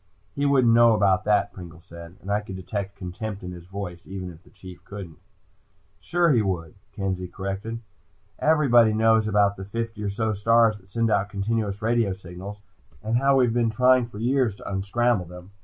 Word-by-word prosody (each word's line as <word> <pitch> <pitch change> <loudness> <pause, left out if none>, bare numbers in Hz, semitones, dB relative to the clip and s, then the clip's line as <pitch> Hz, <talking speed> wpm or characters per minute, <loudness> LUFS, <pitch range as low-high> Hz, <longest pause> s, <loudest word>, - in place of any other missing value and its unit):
"He 145 0 0
wouldn't 130 -5 +4
know 115 -1 +6
about 100 -3 +2
that," 100 -1 +2
Pringle 85 -2 -11
said, 85 -1 -11
and 100 - -6
I 105 - +2
could 105 -3 -8
detect 100 +2 -5
contempt 100 +2 -6
in 90 - -6
his 85 -1 -11
voice, 90 -3 -6
even 95 -1 -6
if 80 -1 -15
the - - -22
Chief 90 -2 -12
didn't. 95 -5 -9 0.8
"Sure 175 -1 +2
he 120 -5 +4
would," 85 -6 -3 0.2
Kenzie 95 -2 -3
corrected. 100 +5 -5 0.6
"Everybody 125 -8 +4
knows 110 0 +3
about 100 -1 +2
the 95 - -7
fifty 115 +1 -5
or 105 - -2
so 110 +2 -1
stars 115 +2 +3
that 95 -2 -22
send 115 +2 0
out 100 0 +1
continuous 105 0 -2
radio 115 -3 +1
signals, 95 +2 -9 0.4
and 110 +2 +1
how 135 +2 +3
we've 125 -3 +3
been 120 -1 +2
trying 125 +2 +3
for 110 - -12
years 120 -1 +1
to - - -11
unscramble 100 +2 0
them." 90 +2 -12
105 Hz, 190 wpm, -25 LUFS, 95-115 Hz, 0.8 s, know